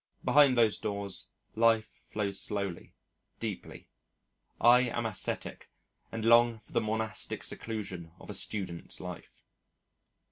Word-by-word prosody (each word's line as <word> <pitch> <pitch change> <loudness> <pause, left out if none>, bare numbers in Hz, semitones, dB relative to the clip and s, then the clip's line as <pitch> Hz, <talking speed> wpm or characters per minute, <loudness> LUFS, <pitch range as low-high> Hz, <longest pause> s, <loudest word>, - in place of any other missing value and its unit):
Behind 140 -3 +6
those 115 -3 +4
doors, 100 -2 -2 0.3
life 115 -1 +2
flows 100 -2 -2
slowly, 100 -4 -3 0.4
deeply. - - -6 0.7
I 120 +1 +7
am 120 0 -2
ascetic 105 -5 -3 0.4
and 115 -1 -4
long 115 0 +6
for 110 - -19
the 115 - +2
monastic 110 0 -1
seclusion 95 -7 -4
of - - -13
a - - -5
student's 90 -5 -2
life. - - -9
110 Hz, 115 wpm, -31 LUFS, 100-115 Hz, 0.7 s, I